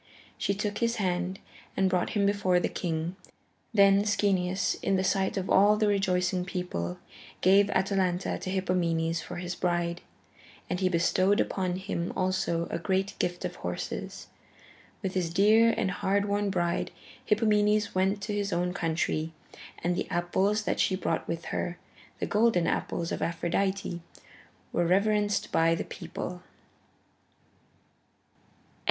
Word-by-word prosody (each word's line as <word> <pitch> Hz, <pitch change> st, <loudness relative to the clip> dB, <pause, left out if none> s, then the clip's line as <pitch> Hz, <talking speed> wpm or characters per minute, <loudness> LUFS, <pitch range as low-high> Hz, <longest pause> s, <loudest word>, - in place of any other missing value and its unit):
She 200 Hz, -, -1 dB
took 210 Hz, +1 st, -2 dB
his 235 Hz, 0 st, +1 dB
hand 180 Hz, -1 st, -1 dB, 0.4 s
and 190 Hz, -, +3 dB
brought 180 Hz, -1 st, +1 dB
him 200 Hz, -, +3 dB
before 195 Hz, -3 st, +2 dB
the -, -, 0 dB
king. 165 Hz, +1 st, -3 dB, 0.5 s
Then 200 Hz, -2 st, +5 dB
Schoeneus, 195 Hz, -3 st, +1 dB
in 195 Hz, -, +1 dB
the 185 Hz, -, +1 dB
sight 190 Hz, +2 st, +1 dB
of 190 Hz, -1 st, -2 dB
all 205 Hz, +2 st, +5 dB
the 215 Hz, -, +2 dB
rejoicing 185 Hz, -2 st, +1 dB
people, 180 Hz, -, -4 dB, 0.4 s
gave 195 Hz, +2 st, +5 dB
Atalanta 190 Hz, -1 st, 0 dB
to -, -, -5 dB
Hippomenes 170 Hz, -3 st, 0 dB
for 180 Hz, -, -8 dB
his 180 Hz, +1 st, -4 dB
bride, 175 Hz, -1 st, -1 dB, 0.7 s
and 180 Hz, -, -2 dB
he 185 Hz, -1 st, +2 dB
bestowed 185 Hz, +3 st, +2 dB
upon 185 Hz, -2 st, 0 dB
him 185 Hz, -2 st, -3 dB
also 185 Hz, -3 st, 0 dB
a -, -, -2 dB
great 190 Hz, +3 st, 0 dB
gift 175 Hz, 0 st, -1 dB
of -, -, -5 dB
horses. -, -, -5 dB, 0.8 s
With 190 Hz, -1 st, -2 dB
his 175 Hz, -3 st, -1 dB
dear 215 Hz, +5 st, +5 dB
and 190 Hz, -, 0 dB
hard 200 Hz, +1 st, 0 dB
won 205 Hz, 0 st, 0 dB
bride, 175 Hz, -3 st, 0 dB, 0.3 s
Hippomenes 210 Hz, -1 st, +2 dB
went 195 Hz, +2 st, +1 dB
to 210 Hz, +1 st, -3 dB
his 205 Hz, -1 st, -1 dB
own 180 Hz, +1 st, 0 dB
country, 160 Hz, -1 st, -1 dB, 0.5 s
and 175 Hz, 0 st, +1 dB
the -, -, -3 dB
apples 190 Hz, +5 st, +1 dB
that -, -, -1 dB
she 190 Hz, -, +2 dB
brought 170 Hz, -3 st, -2 dB
with 165 Hz, 0 st, -4 dB
her, 175 Hz, 0 st, -2 dB, 0.4 s
the -, -, -2 dB
golden 210 Hz, -5 st, +3 dB
apples 170 Hz, 0 st, -1 dB
of -, -, -3 dB
Aphrodite, 175 Hz, +2 st, -1 dB, 0.7 s
were 175 Hz, -1 st, +2 dB
reverenced 205 Hz, +2 st, +2 dB
by 165 Hz, 0 st, +3 dB
the -, -, -3 dB
people. 180 Hz, 0 st, -6 dB
185 Hz, 145 wpm, -28 LUFS, 175-200 Hz, 0.8 s, Then